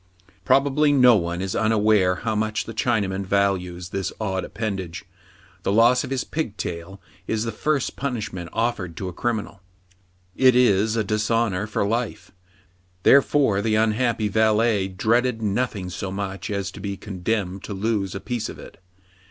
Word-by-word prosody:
Probably 145 Hz, +2 st, +3 dB
no 125 Hz, -4 st, +6 dB
one 85 Hz, -2 st, -1 dB
is 95 Hz, -, -3 dB
unaware 105 Hz, -4 st, +3 dB
how 110 Hz, +4 st, -2 dB
much 110 Hz, 0 st, -1 dB
the 115 Hz, -, -7 dB
Chinaman 100 Hz, -4 st, 0 dB
values 95 Hz, -3 st, 0 dB
this 95 Hz, 0 st, -3 dB
odd 95 Hz, -4 st, -2 dB
appendage. 95 Hz, -7 st, -5 dB, 0.6 s
The -, -, -1 dB
loss 115 Hz, +4 st, +4 dB
of -, -, -6 dB
his 135 Hz, -1 st, -1 dB
pigtail 100 Hz, -, -5 dB, 0.3 s
is 110 Hz, 0 st, 0 dB
the 115 Hz, -, -2 dB
first 140 Hz, +5 st, -1 dB
punishment 110 Hz, -10 st, -4 dB
offered 110 Hz, -8 st, -2 dB
to 95 Hz, -, -4 dB
a -, -, -8 dB
criminal. 105 Hz, -2 st, -3 dB, 0.7 s
It 130 Hz, -2 st, +5 dB
is 110 Hz, -3 st, +3 dB
a 110 Hz, -, +1 dB
dishonor 105 Hz, -1 st, 0 dB
for 105 Hz, -1 st, -1 dB
life: 115 Hz, +2 st, -3 dB, 0.7 s
therefore 135 Hz, -7 st, +4 dB
the 110 Hz, 0 st, +1 dB
unhappy 110 Hz, 0 st, +1 dB
valet 110 Hz, -1 st, +2 dB
dreaded 115 Hz, +5 st, +1 dB
nothing 100 Hz, -3 st, -1 dB
so 95 Hz, +1 st, -4 dB
much 95 Hz, 0 st, -4 dB
as 100 Hz, -2 st, -2 dB
to -, -, -11 dB
be 100 Hz, -1 st, -4 dB
condemned 95 Hz, -1 st, -3 dB
to 100 Hz, -, -5 dB
lose 100 Hz, -2 st, -1 dB
a -, -, -3 dB
piece 120 Hz, +1 st, -3 dB
of -, -, -8 dB
it. -, -, -13 dB
105 Hz, 155 wpm, -23 LUFS, 95-115 Hz, 0.7 s, no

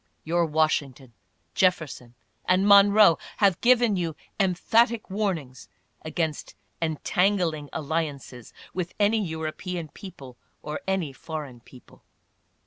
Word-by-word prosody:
Your 170 Hz, +1 st, +1 dB
Washington, 145 Hz, -5 st, -1 dB, 0.4 s
Jefferson 155 Hz, -9 st, 0 dB, 0.3 s
and 185 Hz, +2 st, +2 dB
Monroe 200 Hz, -3 st, +7 dB, 0.2 s
have 195 Hz, -4 st, +2 dB
given 240 Hz, -3 st, +4 dB
you 170 Hz, -4 st, -2 dB, 0.2 s
em 190 Hz, -3 st, +2 dB
phatic 230 Hz, +2 st, +1 dB
warnings 175 Hz, -, -3 dB, 0.3 s
against 155 Hz, -1 st, -3 dB, 0.3 s
"entangling 165 Hz, -1 st, 0 dB
alliances" 145 Hz, -6 st, -4 dB, 0.2 s
with 180 Hz, -1 st, -4 dB
any 210 Hz, +1 st, +2 dB
Eu 160 Hz, -3 st, -5 dB
ropean 165 Hz, +1 st, -5 dB
people 135 Hz, -10 st, -11 dB, 0.3 s
or 150 Hz, 0 st, -5 dB
any 185 Hz, -7 st, -1 dB
foreign 145 Hz, -4 st, -7 dB
people. 125 Hz, +1 st, -18 dB
165 Hz, 110 wpm, -25 LUFS, 150-195 Hz, 0.4 s, Monroe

